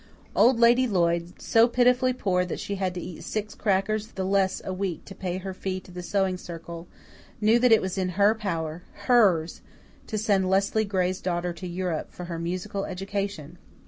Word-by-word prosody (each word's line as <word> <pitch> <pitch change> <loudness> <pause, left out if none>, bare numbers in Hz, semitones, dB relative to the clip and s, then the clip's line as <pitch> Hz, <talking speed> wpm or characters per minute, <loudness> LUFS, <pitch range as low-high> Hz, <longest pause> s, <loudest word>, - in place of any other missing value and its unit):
Old 245 -1 +5
Lady 240 +2 +5
Lloyd, 170 -3 0
so 225 +1 +4
pitifully 250 +1 +3
poor 190 -7 0
that 180 - -4
she 200 - -4
had 190 -2 -2
to - - -3
eat 175 -1 -8
six 215 -1 -4
crackers 210 +1 0
the 190 -4 -5
less 190 0 +1
a 190 - -3
week 185 -3 -3
to 195 - -9
pay 185 -2 -4
her 190 0 -5
fee 185 0 -3
to 185 - -15
the 180 0 -6
Sewing 190 0 0
Circle, 170 0 -8 0.5
knew 220 +2 +4
that 250 0 +4
it 225 - +6
was 190 +1 -2
in 185 -1 0
her 205 +1 +5
power 170 -7 -3 0.2
HERS 195 -10 +3 0.5
to 215 - -3
send 200 -3 +1
Leslie 200 +3 +2
Gray's 185 -1 -1
daughter 175 -1 -1
to 180 +2 -7
Europe 175 -2 -3
for 180 - -8
her 170 -1 -5
musical 180 +3 -3
education! 195 -4 -4
190 Hz, 190 wpm, -26 LUFS, 180-210 Hz, 0.5 s, it